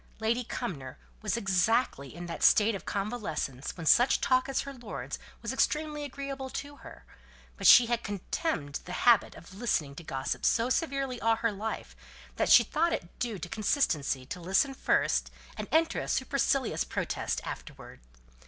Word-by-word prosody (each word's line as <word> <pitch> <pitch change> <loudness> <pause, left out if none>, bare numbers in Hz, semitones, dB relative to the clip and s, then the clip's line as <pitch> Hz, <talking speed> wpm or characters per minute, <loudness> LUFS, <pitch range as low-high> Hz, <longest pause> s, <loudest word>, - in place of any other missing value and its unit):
Lady 230 +3 0
Cumnor 165 - -5 0.2
was 210 -1 -1
exactly 190 - +1
in 175 0 -7
that 170 -1 -6
state 220 +1 +5
of 195 - -7
convalescence 195 - -3
when 165 - -6
such 245 - +5
talk 255 +1 +2
as 270 - 0
her 275 0 -7
lord's 240 -4 -6 0.2
was - - -2
extremely 300 -1 0
agreeable 275 -1 -5
to 285 +2 -6
her, - - -13 0.5
but - - +1
she 245 - +10
had 235 0 -1
contemned 195 - -3
the 180 - -6
habit 235 -3 +5
of 175 - -13
listening 190 -10 -1
to 170 - -10
gossip 135 -4 -3
so 235 +2 +2
severely 275 -5 -1
all 225 0 +3
her 230 0 0
life, 215 +2 -5 0.4
that - - +1
she - - +9
thought 335 +3 0
it 170 - -6
due 230 -4 -2
to 175 - -6
consistency 165 - 0
to 180 - -7
listen 195 +10 +2
first, - - +1 0.3
and - - -5
enter 325 +1 +2
a - - -4
supercilious 270 -1 0
protest - - -2
afterwards. - - -9
225 Hz, 165 wpm, -29 LUFS, 175-265 Hz, 0.5 s, she